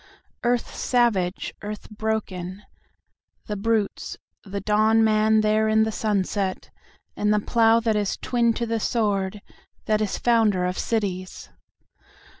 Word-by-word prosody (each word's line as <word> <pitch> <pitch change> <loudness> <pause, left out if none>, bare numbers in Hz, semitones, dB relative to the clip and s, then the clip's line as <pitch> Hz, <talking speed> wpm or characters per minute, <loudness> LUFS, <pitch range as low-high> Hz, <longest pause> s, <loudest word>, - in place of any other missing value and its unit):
Earth 240 0 0
savage, 210 -7 0
earth 210 0 -7
broken, 205 -3 -3 0.8
the 210 - -4
brutes, 215 0 -1 0.3
the 200 0 -5
dawn 215 +2 +3
man 215 0 +3
there 215 0 +2
in 220 0 +4
the 220 - -1
sunset, 200 -2 -2 0.4
And 210 0 +1
the 210 - +3
Plough 225 +1 +3
that 225 -2 +1
is 205 -2 -1
twin 235 -2 +1
to 235 - -2
the 230 0 -1
Sword, 205 -3 -1 0.4
that 215 0 +1
is 210 - -1
founder 220 -6 +2
of 180 0 -2
cities! 185 - -3
215 Hz, 130 wpm, -24 LUFS, 200-225 Hz, 0.8 s, in